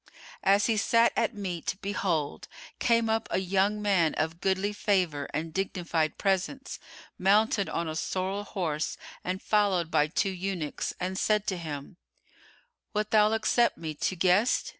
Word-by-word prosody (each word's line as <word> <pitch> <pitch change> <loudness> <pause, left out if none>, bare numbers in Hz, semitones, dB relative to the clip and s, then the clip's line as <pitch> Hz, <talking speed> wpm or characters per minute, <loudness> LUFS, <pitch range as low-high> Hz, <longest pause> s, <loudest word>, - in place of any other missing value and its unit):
As 200 +1 +4
he 225 -2 +1
sat 230 +4 +3
at 230 0 0
meat, 185 -3 -3
behold, 180 -7 -2 0.3
came 230 -1 +3
up 225 +1 0
a - - 0
young 195 +3 +1
man 185 -6 +2
of 160 +2 -2
goodly 195 +2 0
favour 180 -9 0
and 160 +2 -3
dignified 170 -4 -1
presence, 195 +8 -1 0.4
mounted 200 +1 +3
on 170 - -2
a 155 - -4
sorrel 190 +4 -2
horse 165 -7 -2 0.3
and 185 +2 -3
followed 195 -6 +2
by 150 - +3
two 190 +5 0
eunuchs, 185 -4 -3
and 185 +2 -2
said 210 -1 +2
to 195 - -1
him, 155 0 -7 1.0
"Wilt 210 0 -1
thou 215 0 +5
accept 230 +2 +2
me 160 -2 -5
to 170 +5 -2
guest?" 185 +7 +3
190 Hz, 150 wpm, -28 LUFS, 170-210 Hz, 1.0 s, thou